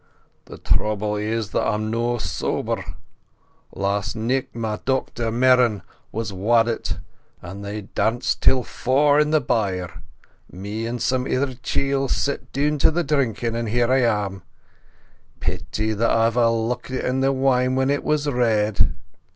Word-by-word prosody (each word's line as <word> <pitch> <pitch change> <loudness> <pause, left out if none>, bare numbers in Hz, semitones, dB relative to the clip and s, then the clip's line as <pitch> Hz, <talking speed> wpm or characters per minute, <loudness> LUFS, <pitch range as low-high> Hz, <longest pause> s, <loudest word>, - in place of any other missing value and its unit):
"The - - -10
trouble 105 0 0
is 105 0 -2
that - - +1
I'm 110 +1 -1
no 120 +1 0
sober. 110 - -2 0.9
Last 100 +2 -1
nicht 125 +4 -1
my 110 -2 -2
dochter 130 -3 -1
Merran 120 -4 +3 0.3
was 110 -2 -3
waddit, 115 +4 +1 0.4
and 95 +3 -8
they 105 +1 -5
danced 115 +4 -1
till 130 -1 +4
fower 145 +5 +2
in 150 0 +3
the 155 0 +4
byre. 100 - -2 0.5
Me 105 +5 -5
and 120 +1 -3
some 130 +1 0
ither 130 0 0
chiels 135 +2 -1
sat 140 - -2
down 150 +2 0
to - - +5
the 170 +2 0
drinkin', 125 -6 0
and 115 -1 -2
here 120 +2 +2
I 130 - +4
am. 105 -5 0 1.0
Peety 90 +5 -2
that 115 +2 +1
I 115 0 +3
ever 115 +1 +3
lookit 120 +3 -2
on 130 +1 0
the 135 +1 +3
wine 130 -1 +2
when 130 +1 +2
it 145 - 0
was 150 -1 0
red!" 110 -6 +2
115 Hz, 150 wpm, -22 LUFS, 105-130 Hz, 1.0 s, to